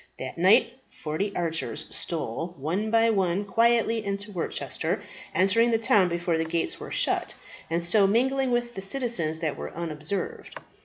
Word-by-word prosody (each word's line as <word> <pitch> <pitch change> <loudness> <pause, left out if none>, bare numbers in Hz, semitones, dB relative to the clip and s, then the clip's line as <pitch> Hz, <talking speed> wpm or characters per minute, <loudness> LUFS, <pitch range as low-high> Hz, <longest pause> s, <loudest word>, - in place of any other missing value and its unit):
That 130 -1 -6
night 225 +8 +4
forty 160 +7 -3
archers 165 -2 -2
stole, 165 +2 -3
one 175 +10 -2
by 230 0 +4
one, 195 -1 0
quietly 230 +1 +2
into 200 +1 -4
Worcester, 175 -4 -3 0.3
entering 195 +6 +4
the 230 - +3
town 205 -4 +3
before 170 -1 -1
the - - +1
gates 165 +1 -2
were - - -7
shut, - - +1 0.3
and 170 +1 0
so 195 +3 +4
mingling 265 +5 +2
with 240 0 0
the 195 - -6
citizens 195 - 0
that 155 -3 0
they - - -13
were - - -5
unobserved. 165 +2 -4
195 Hz, 160 wpm, -26 LUFS, 165-230 Hz, 0.3 s, night